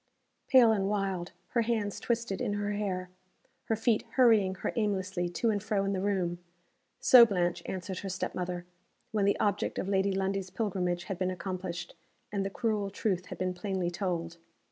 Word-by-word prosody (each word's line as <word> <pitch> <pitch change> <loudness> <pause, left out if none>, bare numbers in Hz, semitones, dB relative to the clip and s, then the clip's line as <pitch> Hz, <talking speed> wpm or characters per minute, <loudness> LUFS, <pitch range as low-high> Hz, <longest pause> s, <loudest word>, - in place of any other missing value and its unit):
Pale 245 -4 +7
and 195 -2 +1
wild; 195 -4 -1 0.2
her 235 - +2
hands 220 -3 -1
twisted 235 -4 -1
in 225 -5 0
her 205 0 -1
hair; 185 -3 -2 0.5
her 225 - +1
feet 225 0 +2
hurrying 220 -7 +5
her - - -3
aimlessly 190 -5 -1
to 225 +6 +1
and 205 -1 -1
fro 205 -1 0
in 195 - 0
the 185 - -1
room 185 -4 0 0.6
so 250 -2 +9
Blanche 180 -6 +1
answered 185 0 -4
her 195 - -5
step 185 0 -3
mother, 180 -1 -3 0.5
when 210 -3 +1
the 200 - +2
object 205 -1 0
of - - -2
Lady 195 0 +2
Lundie's 195 0 -1
pilgrimage 180 -5 -1
had 195 -3 -5
been 185 -1 +1
accomplished, 180 -1 -4 0.4
and 200 -2 -1
the 195 - -2
cruel 210 -2 -1
truth 190 -2 -1
had - - -7
been 185 0 -1
plainly 180 -1 -2
told. 170 -3 -3
195 Hz, 180 wpm, -30 LUFS, 185-210 Hz, 0.6 s, so